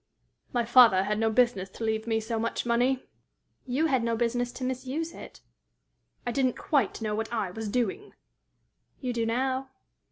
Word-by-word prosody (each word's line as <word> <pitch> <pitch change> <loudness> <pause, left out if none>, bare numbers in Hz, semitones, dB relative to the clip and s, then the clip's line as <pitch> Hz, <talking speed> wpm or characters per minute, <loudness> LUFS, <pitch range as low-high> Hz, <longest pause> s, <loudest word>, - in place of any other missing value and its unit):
"My 240 -1 0
father 230 -6 +7
had 210 +2 -1
no 225 0 +2
business 220 -5 +2
to 225 - -8
leave 220 0 -1
me 225 -1 +1
so 225 +1 -3
much 230 +2 -2
money." 245 +2 +2 0.6
"You 265 +6 +1
had 265 -6 +2
no 230 0 +1
business 245 +1 0
to 260 - -7
misuse 260 +6 -3
it." - - -11 0.8
"I 240 - -1
didn't 255 0 +1
quite 260 -6 0
know 215 -1 -1
what 220 +2 -3
I 215 -6 -1
was 220 +2 -5
doing." 245 - -2 0.9
"You 250 -2 -2
do 230 -1 0
now." 260 +3 -1
235 Hz, 170 wpm, -28 LUFS, 220-255 Hz, 0.9 s, father